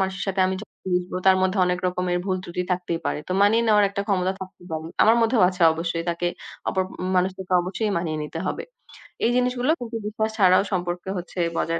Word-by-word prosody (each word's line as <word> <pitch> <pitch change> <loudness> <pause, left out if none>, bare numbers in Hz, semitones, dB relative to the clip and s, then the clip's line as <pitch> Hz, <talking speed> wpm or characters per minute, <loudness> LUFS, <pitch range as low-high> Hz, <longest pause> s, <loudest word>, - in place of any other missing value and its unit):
মানুষের 190 0 -1
সাথে 190 0 0
আমি 190 - -1
যখন - - -15 0.2
মিশবো 180 0 -1
তার 190 0 +7
মধ্যে 190 +1 +1
অনেক 180 0 0
রকমের 180 0 0
ভুল-ত্রুটি 185 -2 -2
থাকতেই 175 -2 -1
পারে, - - -1
তো - - -1
মানিয়ে 225 +3 +4
নেওয়ার 210 -2 +5
একটা 200 0 -2
ক্ষমতা 190 -1 +1
থাকতেই 185 -1 -10
পারে। 160 0 -3 0.2
আমার 225 +2 +6
মধ্যেও 225 -2 +3
আছে, 185 -1 -6
অবশ্যই 165 +1 -3
তাকে 170 +1 -2 0.4
অপর 190 - +1 0.3
মানুষের 185 +1 +1
সাথে 185 -1 -2
অবশ্যই 205 +4 -2
মানিয়ে 160 -2 -2
নিতে 150 +2 -6
হবে। - - -2 0.6
এই 235 - +3
জিনিসগুলো 250 +2 +1
কিন্তু 230 -1 -6
বিশ্বাস 220 +1 -1
ছাড়াও 185 -1 +5
সম্পর্কে 175 0 -2
হচ্ছে 180 +1 -6 0.2
বজায় 165 0 0
185 Hz, 200 wpm, -24 LUFS, 175-205 Hz, 0.6 s, তার